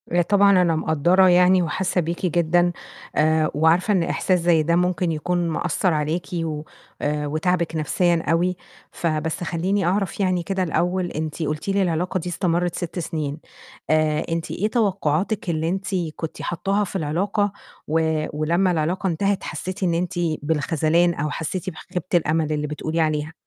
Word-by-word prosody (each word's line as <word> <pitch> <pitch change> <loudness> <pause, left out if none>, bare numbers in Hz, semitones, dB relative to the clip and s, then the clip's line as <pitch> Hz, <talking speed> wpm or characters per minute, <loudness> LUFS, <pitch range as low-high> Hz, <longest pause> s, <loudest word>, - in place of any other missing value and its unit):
آآ 175 +1 +3
طبعًا 200 +1 +4
أنا 170 -2 +2
مقدّرة 170 +4 +3
يعني 180 +1 +5
وحاسة 180 +3 0
بيكِ 170 +3 -3
جدًا 175 +1 +2 0.4
آآ 155 0 +2
وعارفة 165 +6 +3
إن 185 -4 +2
إحساس 180 +2 +1
زي 165 -2 +3
ده 170 +2 +2
ممكن 180 0 +1
يكون 175 +2 -1
مأثّر 175 +2 0
عليكِ 155 +3 -1
و 160 -3 -2 0.4
آآ 150 0 -1
وتاعبِك 165 +2 0
نفْسيًا 170 +2 +1
أوي، 175 +2 +1 0.3
فبس 160 0 -2
خلّيني 185 +3 0
أعرف 195 +2 0
يعني 185 -3 +1
كده 190 +1 -1
الأول 180 +2 0
أنتِ 155 +1 -4
قُلتِ 155 +4 -3
لي 195 0 +2
العلاقة 180 +1 0
دي 180 - -5
استمرت 175 0 0
6 175 +1 -4
سنين، 155 -3 -3 0.5
آآ 155 -1 +2
أنتِ 165 0 -2
إيه 210 - 0
توقعاتِك 195 -3 0
اللي 160 0 0
أنتِ 190 +2 -3 0.3
كنت 160 - -6
حاطاها 195 +4 -1
في 195 - -7
العلاقة 195 +5 0 0.4
و 160 0 +1
ولمّا 170 +5 +1
العلاقة 175 +4 0
انتهت 195 +3 0
حسيتِ 185 +5 -5
إن 175 -2 +2
أنت 175 +1 -1 0.3
بالخذلان، 160 +3 +2
أو 150 -1 -2
حسيتِ 165 +4 -3
بخيبة 180 0 -6
الأمل 155 -1 +1
اللي 150 0 -2
بتقولي 155 +2 -3
عليها؟ 155 0 -1
170 Hz, 160 wpm, -22 LUFS, 155-185 Hz, 0.5 s, يعني